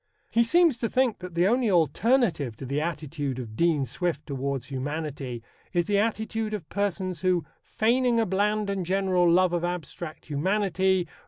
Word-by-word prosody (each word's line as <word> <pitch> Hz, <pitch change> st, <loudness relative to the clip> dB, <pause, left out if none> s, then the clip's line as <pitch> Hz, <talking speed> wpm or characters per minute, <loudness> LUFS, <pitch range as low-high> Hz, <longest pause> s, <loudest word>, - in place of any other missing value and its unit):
He 235 Hz, -, +4 dB
seems 325 Hz, 0 st, +4 dB
to 230 Hz, -, -1 dB
think 255 Hz, -4 st, +1 dB
that 180 Hz, -2 st, -8 dB
the 175 Hz, +2 st, +3 dB
only 240 Hz, +1 st, +2 dB
alternative 175 Hz, -, +2 dB
to 135 Hz, -, -7 dB
the 140 Hz, +3 st, -1 dB
attitude 150 Hz, -4 st, -3 dB
of 115 Hz, -4 st, -7 dB
Dean 160 Hz, -1 st, +2 dB
Swift 150 Hz, +5 st, -2 dB
towards 135 Hz, -2 st, -3 dB
humanity 135 Hz, -3 st, -4 dB, 0.3 s
is 175 Hz, -1 st, +2 dB
the 205 Hz, -1 st, +2 dB
attitude 220 Hz, 0 st, -1 dB
of 175 Hz, -7 st, -7 dB
persons 190 Hz, -3 st, -2 dB
who, 180 Hz, -4 st, +1 dB, 0.2 s
"feigning 240 Hz, +1 st, +1 dB
a 225 Hz, -, +2 dB
bland 210 Hz, +2 st, 0 dB
and 195 Hz, -2 st, -1 dB
general 185 Hz, -1 st, +2 dB
love 180 Hz, +1 st, +4 dB
of 175 Hz, -1 st, 0 dB
abtract 175 Hz, -2 st, -5 dB
humanity 190 Hz, +3 st, +1 dB
180 Hz, 165 wpm, -26 LUFS, 150-210 Hz, 0.3 s, He